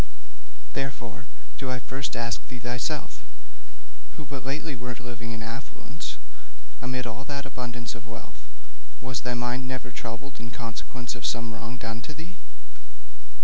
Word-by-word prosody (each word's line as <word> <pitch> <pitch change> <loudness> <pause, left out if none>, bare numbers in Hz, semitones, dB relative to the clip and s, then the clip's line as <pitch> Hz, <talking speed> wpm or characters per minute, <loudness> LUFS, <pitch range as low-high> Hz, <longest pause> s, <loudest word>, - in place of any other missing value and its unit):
Therefore 130 -3 +1 0.3
do 135 - +2
I 130 - +5
first 130 +2 +1
ask 115 +1 +4
thee 125 - -2
thyself, 120 +1 +2 1.0
who 150 - -2
but 135 -1 -1
lately 140 +2 +2
wert 125 -1 -1
living 120 -2 -2
in 115 -1 0
affluence, 115 -9 -2 0.6
amid 125 0 +3
all 120 +3 0
that 140 -1 +1
abundance 125 -3 0
of 115 -1 -6
wealth, 90 - -6 0.5
was 130 -1 +2
thy 125 -1 +3
mind 120 +2 +3
never 130 -1 0
troubled 120 +3 -2
in 115 - -2
consequence 120 +1 -1
of 125 - -3
some 115 0 +4
wrong 115 +2 -2
done 115 0 0
to 150 +4 -3
thee?' 165 +4 -4
125 Hz, 145 wpm, -32 LUFS, 115-130 Hz, 1.0 s, I